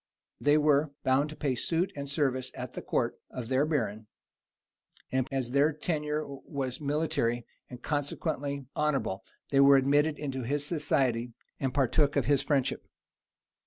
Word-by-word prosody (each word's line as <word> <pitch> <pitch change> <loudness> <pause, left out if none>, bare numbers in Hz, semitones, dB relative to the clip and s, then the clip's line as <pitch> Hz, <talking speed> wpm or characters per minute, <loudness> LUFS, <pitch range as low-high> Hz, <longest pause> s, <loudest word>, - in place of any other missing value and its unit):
They 145 +1 +4
were; 150 0 +3
bound 135 +3 +2
to 155 - -8
pay 140 -4 0
suit 165 +8 0
and 140 -1 -5
service 135 -3 0
at - - -6
the - - -5
court - - -1
of 120 -2 -6
their 135 +3 +2
baron; 110 -8 -1 1.0
and 130 0 +1
as 130 -3 -2
their 140 +3 +4
tenure 150 -1 -2
was 135 -1 -5
military, 145 -5 0 0.2
and 125 -1 -10
consequently 145 -1 -2
honorable, 140 -10 0 0.3
they 135 - +4
were 140 0 +8
admitted 145 +3 +3
into 135 -3 -3
his 140 +4 -1
society, 135 -7 0 0.3
and 135 -2 0
partook 140 +2 +2
of - - +2
his 140 -1 +3
friendship. 135 -2 0
140 Hz, 150 wpm, -29 LUFS, 130-150 Hz, 1.0 s, were